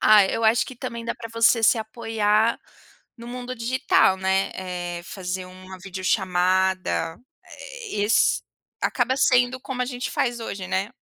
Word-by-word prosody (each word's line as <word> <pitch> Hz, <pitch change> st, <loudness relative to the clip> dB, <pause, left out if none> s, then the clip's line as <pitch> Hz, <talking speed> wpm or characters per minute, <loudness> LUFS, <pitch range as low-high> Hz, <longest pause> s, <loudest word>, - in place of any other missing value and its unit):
ah, 210 Hz, -2 st, +7 dB
eu 225 Hz, +4 st, -2 dB
acho 220 Hz, +1 st, +4 dB
que 260 Hz, -, -10 dB
também 235 Hz, -2 st, -6 dB
dá 235 Hz, -, -2 dB
pra 230 Hz, -2 st, -9 dB
você 230 Hz, 0 st, +4 dB
se 225 Hz, +1 st, +5 dB
apoiar 220 Hz, 0 st, +1 dB, 0.6 s
no 235 Hz, -, -10 dB
mundo 250 Hz, +1 st, -6 dB
digital, 230 Hz, -5 st, +2 dB
né. 190 Hz, +1 st, +1 dB
Eh, 175 Hz, -2 st, -5 dB
fazer 185 Hz, 0 st, -5 dB
uma 185 Hz, +1 st, -11 dB
videochamada. 185 Hz, -2 st, 0 dB, 0.7 s
Esse 205 Hz, +2 st, +2 dB, 0.4 s
acaba 255 Hz, +1 st, +1 dB
sendo 250 Hz, 0 st, +3 dB
como 255 Hz, -1 st, -4 dB
a 250 Hz, -, +1 dB
gente 250 Hz, +1 st, -4 dB
faz 240 Hz, -2 st, -1 dB
hoje, 195 Hz, -4 st, -5 dB
né, 190 Hz, +3 st, -1 dB
215 Hz, 145 wpm, -24 LUFS, 190-240 Hz, 0.7 s, ah